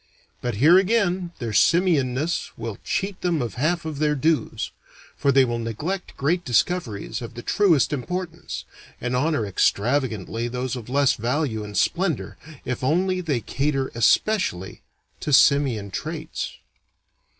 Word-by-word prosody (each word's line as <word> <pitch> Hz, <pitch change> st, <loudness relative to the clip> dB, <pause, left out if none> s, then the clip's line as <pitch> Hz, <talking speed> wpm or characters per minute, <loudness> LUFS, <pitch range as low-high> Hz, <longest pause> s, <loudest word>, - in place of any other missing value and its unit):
But 120 Hz, -3 st, -2 dB
here 155 Hz, -, +6 dB
again 190 Hz, -4 st, +1 dB
their 115 Hz, -4 st, -4 dB
simian 160 Hz, -, +3 dB
ness 155 Hz, +6 st, -2 dB
will 115 Hz, -2 st, -5 dB
cheat 195 Hz, -1 st, -2 dB
them 175 Hz, -3 st, +1 dB
of 120 Hz, -4 st, -3 dB
half 165 Hz, +6 st, 0 dB
of 155 Hz, -3 st, -5 dB
their 150 Hz, -1 st, +2 dB
dues, 150 Hz, -5 st, 0 dB, 0.4 s
for 140 Hz, -, +2 dB
they 135 Hz, -1 st, +5 dB
will 120 Hz, -1 st, -2 dB
neglect 150 Hz, -, -4 dB
great 170 Hz, +6 st, +1 dB
discoveries 125 Hz, -, 0 dB
of 115 Hz, -1 st, -8 dB
the 120 Hz, -, -7 dB
truest 175 Hz, -9 st, +3 dB
importance, 170 Hz, +5 st, -4 dB, 0.3 s
and 125 Hz, +1 st, -2 dB
honor 145 Hz, -3 st, +1 dB
extravagantly 115 Hz, +2 st, 0 dB
those 125 Hz, +1 st, -3 dB
of 125 Hz, -2 st, -8 dB
less 140 Hz, 0 st, +3 dB
value 120 Hz, -1 st, -1 dB
and 105 Hz, -1 st, -6 dB
splendor 175 Hz, -2 st, 0 dB, 0.3 s
if 125 Hz, 0 st, -3 dB
only 180 Hz, +6 st, +1 dB
they 145 Hz, -9 st, -1 dB
cater 135 Hz, +3 st, -1 dB
especially 115 Hz, -, +1 dB, 0.4 s
to 150 Hz, -, -3 dB
simian 130 Hz, -7 st, +4 dB
traits. 155 Hz, -, -4 dB
140 Hz, 140 wpm, -24 LUFS, 120-170 Hz, 0.4 s, here